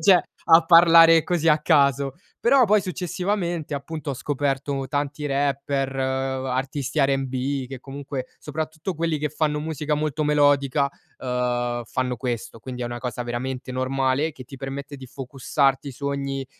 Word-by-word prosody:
cioè 185 -2 +6 0.2
a 165 0 +7
parlare 165 -1 +8
così 165 -2 +1
a 150 - +5
caso. 140 -4 +2 0.2
Però 255 +1 +5
poi 210 +1 +4
successivamente 180 -2 -2
appunto, 150 +1 -5
ho - - -3
scoperto 140 0 -2
tanti 145 0 -2
rapper, 140 -1 0
uhm, 130 0 -1
artisti 135 +3 -2
R&B 135 0 0
che 130 -1 -8
comunque 135 -1 -6
soprattutto 155 +4 -4
quelli 165 0 0
che 150 +1 -1
fanno 150 -1 0
musica 155 -1 -3
molto 150 0 -1
melodica, 145 -1 +3 0.3
uhm, 120 -1 -1
fanno 125 +1 -2
questo. 120 -3 -4
Quindi 125 0 -7
è 120 - -1
una 120 0 -5
cosa 125 -1 -4
veramente 125 +2 -4
normale 135 +3 0
che 130 - -11
ti 135 +2 -11
permette 140 +1 -6
di 130 -1 -10
focusarti 135 +2 -1
su 140 +2 -6
ogni 140 -1 -3
140 Hz, 150 wpm, -24 LUFS, 130-155 Hz, 0.3 s, parlare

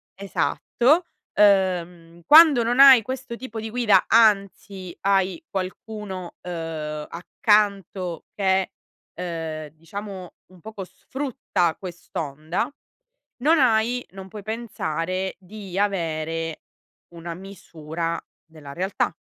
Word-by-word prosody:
esatto, 245 - +1 0.3
ehm, 180 -4 +2
quando 305 -4 +8
non 240 +3 0
hai 270 -3 +10
questo 260 +1 -6
tipo 235 -2 -7
di 220 0 -5
guida, 215 -6 +4
anzi, 200 -4 +2
hai 195 - +1
qualcuno, 190 -1 -6
ehm, 160 -3 -5
accanto 195 -1 0
che, 190 -2 +1 0.4
ehm, 160 -3 -5
diciamo, 185 +4 -8 0.2
un 185 -2 -18
poco 215 -1 -7
sfrutta 210 - -2
quest'onda, 160 - -4 0.7
non 320 +2 +5
hai 245 0 +2
non 190 0 -10
puoi 210 +2 -8
pensare 190 -5 -3
di 195 0 -9
avere 165 -5 -1 0.5
una 170 0 -7
misura 170 -3 -5 0.3
della 155 -3 -11
realtà. 190 +5 -1
190 Hz, 100 wpm, -24 LUFS, 170-220 Hz, 0.7 s, hai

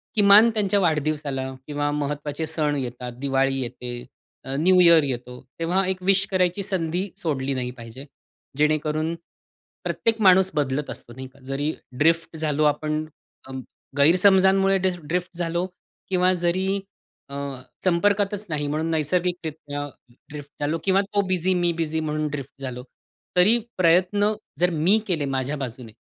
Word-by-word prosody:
किमान 210 +2 +7
त्यांच्या 205 -2 +1
वाढदिवसाला 150 -5 -1
किंवा 145 0 -1
महत्त्वाचे 145 +1 -3
सण 155 -2 -1
येतात, 125 -1 -5
दिवाळी 135 0 +1
येते, 120 0 -6 0.4
अ, 135 - -4
न्यू 185 +3 +4
इयर 170 -3 +7
येतो 125 -2 -5 0.2
तेव्हा 180 +3 +1
एक 185 -1 -2
विश 195 +1 +3
करायची 185 +1 +1
संधी 185 0 -2
सोडली 140 -4 -1
नाही 125 -1 -3
पाहिजे. 115 +4 -10 0.5
जेणेकरून, 155 +1 +1 0.7
प्रत्येक 230 -1 0
माणूस 190 -1 +6
बदलत 145 0 -1
असतो 120 - -8
नाही 130 +2 -8
का. 135 +1 -22
जरी 135 +3 -2 0.3
ड्रिफ्ट 165 +1 +2
झालो 155 -1 0
आपण 155 +1 -3 0.4
अ, - - -9 0.5
गैरसमजांमुळे 190 +4 +5
ड्रि 190 0 +1
ड्रिफ्ट 175 +3 -3
झालो 170 +1 -1 0.4
किंवा 185 0 +3
जरी 190 +3 +1 0.5
अ, 140 - -7 0.5
संपर्कातच 205 +3 +1
नाही, 150 -1 -2
म्हणून 155 +3 -1
नैसर्गिकरित्या 160 -3 -2 0.4
ड्रिफ्ट 145 -1 -9
झालो 150 +3 0
किंवा 195 0 +4
तो 205 0 0
बिझी 185 0 +1
मी 175 -1 +2
बिझी 160 -1 -2
म्हणून 155 -1 -2
ड्रिफ्ट 140 -1 -7
झालो. 125 -2 -5 0.5
तरी 210 +6 +6 0.2
प्रयत्न 185 +4 +3 0.3
जर 180 +1 +4
मी 175 +6 +3
केले 165 -6 0
माझ्या 135 +2 -2
बाजूने 125 -3 -6
160 Hz, 140 wpm, -24 LUFS, 145-185 Hz, 0.7 s, किमान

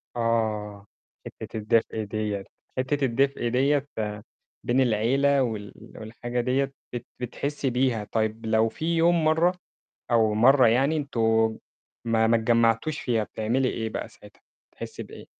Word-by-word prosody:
آه. 110 -3 -1 0.4
حتة - - -8
الدفء 110 0 0
ديّة، 105 -1 -3 0.3
حتة 135 +2 0
الدفء 135 +1 0
ديّة 135 +4 +1 0.8
بين 125 +2 +2
العيلة 130 +4 +2
وال 105 -4 -4 0.2
والحاجة 120 +3 -4
ديّة، 135 +2 0 0.2
بت 120 -1 -5
بتحسِّي 140 +3 -3
بيها. 125 -3 0
طيب، 110 0 -1
لو 110 0 +2
في 165 +8 -2
يوم 170 0 +3
مرة، 160 +3 +3 0.6
أو 110 -2 +3
مرة 130 +4 +6
يعني 135 +7 +3
أنتم 110 -6 +1 0.5
ما 115 -1 +2
ما 115 +1 +4
اتجمعتوش 115 +5 +2
فيها، 115 -3 0
بتعملي 120 +6 -1
إيه 110 -2 -3
بقى - - -5
ساعتها؟ - - -18 0.3
بتحسِّي - - -7
بإيه؟ - - -12
120 Hz, 135 wpm, -26 LUFS, 110-135 Hz, 0.8 s, مرة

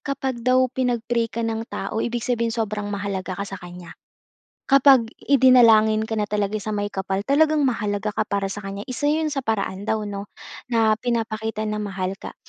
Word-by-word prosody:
kapag 265 -3 -3
daw 255 +2 +3
pinag-pray 240 -2 0
ka 230 +1 -3
ng 225 0 -3
tao 200 +3 -4
ibig 240 0 -2
sabihinin 235 -2 0
sobrang 210 -2 -2
mahalaga 195 -2 -4
ka 200 - -3
sa 195 -1 -8
kaniya. 175 -1 -10 0.8
Kapag 270 -3 +6 0.2
idinalangin 230 -5 +5
ka 220 0 -3
na 210 - +1
talaga 210 0 -1
sa 215 +1 -4
may 205 0 -2
kapal 190 0 -2
talagang 300 +2 +3
mahalaga 210 -4 -1
ka - - -1
para 195 -1 -1
sa 205 - -5
kaniya, 195 0 -6
isa 290 +4 -1
'yon 310 0 +1
sa 280 - -1
paraan 205 -4 -3
daw, 220 -1 0
'no, 200 0 -6 0.4
na 225 -2 +2
pinapakita 220 -2 -2
na 210 0 -2
mahal 195 -3 -3
ka. - - -9
220 Hz, 185 wpm, -23 LUFS, 205-245 Hz, 0.8 s, Kapag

